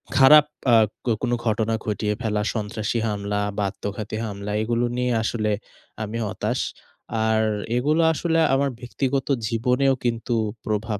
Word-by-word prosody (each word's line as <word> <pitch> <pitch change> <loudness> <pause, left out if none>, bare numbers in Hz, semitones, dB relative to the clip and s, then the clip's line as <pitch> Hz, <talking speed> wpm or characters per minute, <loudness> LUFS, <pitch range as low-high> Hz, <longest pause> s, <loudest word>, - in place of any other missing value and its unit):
খারাপ 145 +3 +8 0.3
আ - - +8 0.3
ক - - -8
কোন 125 -1 -1
ঘটনা 110 0 +1
ঘটিয়ে 105 0 -1
ফেলা, 105 -3 0
সন্ত্রাসী 110 +1 -2
হামলা 105 -1 -2 0.2
বা 105 - +1
আত্মঘাতী 105 +2 -5
হামলা, 100 -1 -5
এগুলো 120 +2 0
নিয়ে 125 0 +1
আসলে 110 -1 0 0.5
আমি 110 +2 -4
হতাশ। 100 - -2 0.7
আর 110 0 +3 0.4
এগুলো 150 +6 +2
আসলে 165 +1 +1
আমার 140 +1 +2
ব্যক্তিগত 135 +2 -2 0.2
জীবনেও 125 +4 +2
কিন্তু 120 0 -1 0.3
প্রভাব 110 0 -2
115 Hz, 135 wpm, -23 LUFS, 105-125 Hz, 0.7 s, খারাপ